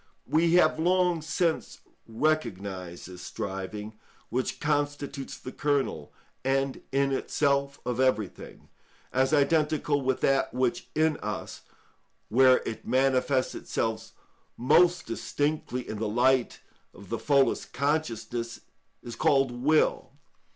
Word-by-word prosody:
We 165 Hz, +1 st, +2 dB
have 160 Hz, -3 st, +4 dB
long 180 Hz, 0 st, +2 dB
since 165 Hz, +1 st, -1 dB, 0.3 s
recognised 100 Hz, -, -2 dB
this 90 Hz, 0 st, -10 dB
striving, 105 Hz, +3 st, -6 dB, 0.3 s
which 125 Hz, +2 st, -2 dB
constitutes 145 Hz, -2 st, -2 dB
the 130 Hz, -, -8 dB
kernel 135 Hz, -, -1 dB, 0.3 s
and 135 Hz, 0 st, 0 dB
in 140 Hz, 0 st, +2 dB
itself 140 Hz, 0 st, 0 dB
of 125 Hz, 0 st, -2 dB
everything, 130 Hz, -7 st, -1 dB, 0.4 s
as 130 Hz, +2 st, +2 dB
identical 150 Hz, 0 st, +2 dB
with 130 Hz, -1 st, -1 dB
that 135 Hz, -2 st, +1 dB
which 125 Hz, -1 st, 0 dB
in 155 Hz, -1 st, +2 dB
us, 105 Hz, -2 st, -5 dB, 0.7 s
where 130 Hz, +2 st, +5 dB
it 110 Hz, -, -6 dB
manifests 130 Hz, 0 st, +2 dB
itself 110 Hz, -1 st, -3 dB, 0.5 s
most 175 Hz, +8 st, +4 dB
distinctly 145 Hz, 0 st, -2 dB
in 105 Hz, -, -5 dB
the 110 Hz, -1 st, -1 dB
light 125 Hz, +2 st, +2 dB, 0.3 s
of 100 Hz, 0 st, -13 dB
the 115 Hz, -, -2 dB
fullest 140 Hz, -2 st, +2 dB
consciousness, 120 Hz, -5 st, -2 dB, 0.4 s
is 120 Hz, -1 st, -7 dB
called 135 Hz, +2 st, +3 dB
will. 140 Hz, +6 st, +1 dB
135 Hz, 115 wpm, -28 LUFS, 115-145 Hz, 0.7 s, where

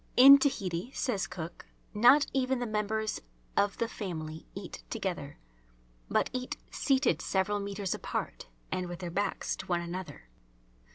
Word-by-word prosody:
In 275 Hz, +2 st, +11 dB
Tahiti, 195 Hz, -, -1 dB
says 215 Hz, -7 st, -1 dB
Cook, 170 Hz, -1 st, -7 dB, 0.3 s
not 245 Hz, +7 st, +6 dB
even 265 Hz, -1 st, +1 dB
the 245 Hz, -, -2 dB
members 215 Hz, 0 st, -1 dB, 0.3 s
of 200 Hz, 0 st, +2 dB
the 230 Hz, -, 0 dB
family 160 Hz, -8 st, -6 dB
eat -, -, -7 dB
together, -, -, -4 dB, 0.7 s
but -, -, +1 dB
eat 255 Hz, 0 st, -3 dB
seated 270 Hz, -2 st, +2 dB
several 200 Hz, +2 st, 0 dB
metres 200 Hz, -1 st, -2 dB
apart -, -, -4 dB, 0.2 s
and 180 Hz, -1 st, -1 dB
with 175 Hz, -, -5 dB
their 175 Hz, -1 st, -5 dB
backs 200 Hz, +3 st, -1 dB
to -, -, -8 dB
one 175 Hz, -1 st, +1 dB
another. 170 Hz, -, -7 dB
205 Hz, 145 wpm, -30 LUFS, 180-245 Hz, 0.7 s, In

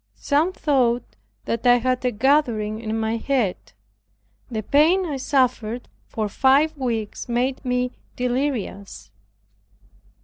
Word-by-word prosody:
Some 305 Hz, +5 st, +1 dB
thought 255 Hz, -8 st, 0 dB, 0.3 s
that 230 Hz, +2 st, -1 dB
I 245 Hz, -, +7 dB
had 255 Hz, +1 st, 0 dB
a 250 Hz, -, +2 dB
gathering 230 Hz, -3 st, +1 dB
in 220 Hz, -1 st, -2 dB
my 220 Hz, +1 st, -1 dB
head. 235 Hz, -6 st, 0 dB, 0.9 s
The 220 Hz, -3 st, -3 dB
pain 325 Hz, -, +3 dB
I 295 Hz, -5 st, -3 dB
suffered 250 Hz, -4 st, 0 dB, 0.2 s
for 215 Hz, -1 st, -3 dB
five 275 Hz, +8 st, +3 dB
weeks 235 Hz, -5 st, -3 dB
made 250 Hz, +3 st, -1 dB
me 250 Hz, -1 st, 0 dB, 0.2 s
delirious. 245 Hz, -, -3 dB
250 Hz, 115 wpm, -23 LUFS, 225-275 Hz, 0.9 s, I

